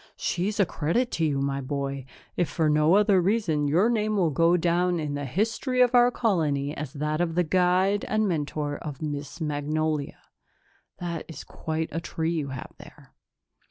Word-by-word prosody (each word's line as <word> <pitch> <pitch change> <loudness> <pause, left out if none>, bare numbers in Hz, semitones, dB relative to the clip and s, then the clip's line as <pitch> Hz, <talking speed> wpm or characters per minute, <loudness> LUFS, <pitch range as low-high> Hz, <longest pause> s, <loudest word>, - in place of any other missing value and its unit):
She's 200 +5 -2
a 200 - +5
credit 175 +11 -1
to 165 - 0
you, 145 -3 0
my 140 0 -1
boy. 140 -1 -3 0.3
If 175 -5 0
for 155 0 +1
no 155 +4 +4
other 205 -2 +4
reason, 175 -7 +1
your 175 +9 +3
name 215 -2 0
will 170 -5 +2
go 165 +5 +3
down 175 +1 +1
in 150 -2 -3
the 145 0 -3
history 225 - -1
of 250 0 +5
our 245 0 +6
colony 155 - 0
as 145 -2 -6
that 150 +2 -1
of 165 -2 -1
the 180 - +3
guide 185 +4 +2
and 215 0 +1
mentor 150 -3 -2
of 150 -2 -7
Miss 145 +1 -5
Magnolia. 150 -1 -2 0.8
That's 170 -2 -6
quite 160 0 -4
a 165 - -3
tree 165 0 -2
you 155 -4 -2
have 130 -1 -7
there." - - -15
160 Hz, 175 wpm, -26 LUFS, 150-185 Hz, 0.8 s, our